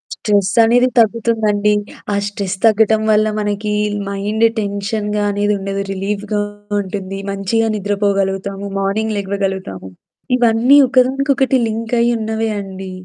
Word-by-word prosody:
Stress 205 -3 +1
అనేది 245 +3 +4
తగ్గుతుందండి. 215 -2 +2 0.4
ఆ - - +1
stress 200 -1 -3
తగ్గటం 220 0 +4
వల్ల 215 0 +3
మనకి 210 0 -2 0.4
మైండ్ 210 +3 0
టెన్షన్‌గా 205 +1 -2
అనేది 205 +1 0
ఉండదు, 195 0 -3
రిలీఫ్‌గా 205 +2 -2 0.4
ఉంటుంది, 195 0 -5
మంచిగా 210 +3 0
నిద్రపోగలుగుతాము. 200 -1 -1
మార్నింగ్ 215 +2 -1
లెగ్వగలుగుతాము. 190 - -3 0.5
ఇవన్నీ 240 +4 +4
ఒకదానికొకటి 270 +1 +2
లింకయ్యి 235 +2 0
ఉన్నవే 220 0 -2
అండి. 190 -1 -7
210 Hz, 105 wpm, -17 LUFS, 195-225 Hz, 0.5 s, అనేది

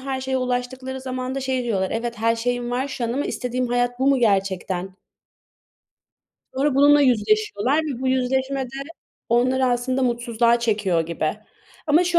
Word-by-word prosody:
her 265 0 -3
şeye 265 0 -1
ulaştıkları 255 +1 -3
zaman 255 0 -4
da 270 - -2
şey 260 -1 -1
diyorlar, 195 -5 -1
"Evet, 235 0 -3
her 230 +1 +2
şeyim 245 +1 -2
var 260 +3 -1
şu 255 -2 -4
an 230 - -1
ama 280 +3 -1
istediğim 250 0 -2
hayat 245 0 0
bu 265 - +1
mu 275 -1 +4
gerçekten?" 195 -3 0 1.6
Sonra 275 +1 +1
bununla 290 +1 +6
yüzleşiyorlar 215 +1 +2
ve 270 -5 -4
bu 260 - 0
yüzleşme 265 +1 0
de - - -9 0.6
onları 255 +3 +2
aslında 255 +2 0
mutsuzluğa 235 -1 +2
çekiyor 205 -7 +1
gibi. 160 -1 -2 0.5
Ama 310 +4 +4
şu 345 -1 +2
250 Hz, 165 wpm, -22 LUFS, 230-265 Hz, 1.6 s, bununla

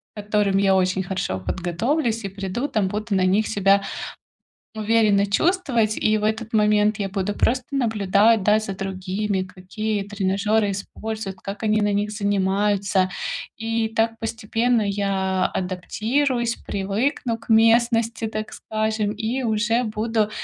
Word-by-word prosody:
которым 205 -2 +1
я 195 -1 +4
очень 185 0 +1
хорошо 180 - -3
подготовлюсь 220 - -1
и - - -3
приду, 195 +7 -3
там, 205 -7 0
буду 210 +1 -2
на 185 -1 +3
них 200 +4 +2
себя 200 -1 +3 0.9
уверенно 215 -2 +3
чувствовать. 235 - +1
И 215 0 +2
в 210 - -2
этот 220 +1 -2
момент 210 0 +3
я 195 -2 -2
буду 200 +1 -2
просто 255 +1 +1
наблюдать, 220 -3 +3
да, 210 +2 +4
за 200 -3 -4
другими, 195 +1 -2
какие 200 +3 -4
тренажёры 205 +1 0
используют, 200 0 -5
как 200 +3 -6
они 215 -1 +2
на 205 0 +1
них 205 +1 0
занимаются. 200 -2 +1 0.5
И 225 0 -1
так 225 0 0
постепенно 225 +1 0
я 195 -2 0
адаптируюсь, 235 +7 -1
привыкну 225 +5 -2
к 230 - -14
местности, 230 0 +3
так 215 0 -5
скажем, 215 -1 -1
и 225 +5 -2
уже 230 +1 +1
буду 215 0 0
210 Hz, 135 wpm, -23 LUFS, 195-225 Hz, 0.9 s, я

